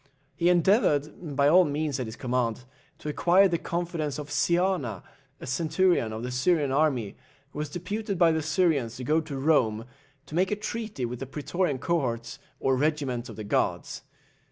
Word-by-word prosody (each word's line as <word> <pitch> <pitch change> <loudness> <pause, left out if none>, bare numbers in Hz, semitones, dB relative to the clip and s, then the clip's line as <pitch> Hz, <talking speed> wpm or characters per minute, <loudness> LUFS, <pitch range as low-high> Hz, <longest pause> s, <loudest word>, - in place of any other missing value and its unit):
He 170 +1 +2
endeavoured, 165 - +2
by 140 0 +4
all 180 +5 +7
means 150 -2 -2
at 125 - -3
his 110 - -7
command, 125 -1 -1 0.3
to 150 - -6
acquire 180 +6 +4
the 170 -3 -1
confidence 170 -5 -3
of 150 -1 -7
Siana, 170 - 0 0.4
a - - -8
centurion 160 -1 +1
of 110 +1 -5
the 125 - -4
Syrian 145 +2 +1
army, 135 -8 +1 0.4
who 150 - -7
was 150 -1 -3
deputed 200 +5 -4
by 170 -2 +5
the 160 0 0
Syrians 155 -8 +1
to 130 - -7
go 155 +5 +2
to 150 -3 -6
Rome, 120 -7 +2 0.4
to - - -13
make 180 +3 +2
a 210 - 0
treaty 215 - -4
with 120 0 -5
the 135 - -5
Pretorian 150 +2 -1
cohorts, 130 -5 -2 0.2
or 135 - +2
regiments 135 -4 -1
of - - -8
the 110 - -6
guards. 105 - -1
150 Hz, 180 wpm, -27 LUFS, 125-175 Hz, 0.4 s, all